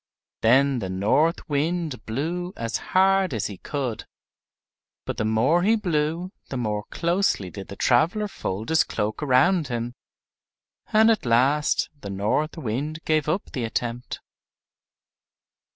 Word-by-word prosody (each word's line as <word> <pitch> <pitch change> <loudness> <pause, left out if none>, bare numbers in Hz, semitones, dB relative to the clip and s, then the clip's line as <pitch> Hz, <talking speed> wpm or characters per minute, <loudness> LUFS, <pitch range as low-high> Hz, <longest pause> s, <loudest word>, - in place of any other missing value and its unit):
Then 130 +3 +4
the 95 -4 -4
North 110 - +1
Wind 155 -1 -2
blew 170 +10 -3
as 115 -1 -2 0.2
hard 190 -5 +4
as 110 - -1
he 100 -3 -6
could, 130 -6 -4 1.0
but - - -4
the 110 - 0
more 115 +11 +3
he 215 +5 +4
blew 170 -2 -1 0.2
the 135 - -3
more 105 -3 -2
closely 170 - 0
did 95 +3 -8
the 100 - -8
traveler 170 - +2
fold 105 - -5
his 160 0 +4
cloak 105 +5 -3
around 150 +5 +3
him; 120 -1 -3 1.0
and 220 +1 +6
at 220 - 0
last 130 +6 +2
the 100 - -6
North 105 - -1
Wind 145 +3 -3
gave 155 -1 +1
up 185 +6 -2
the 130 - -3
attempt. 120 +1 -3
140 Hz, 135 wpm, -24 LUFS, 115-170 Hz, 1.0 s, and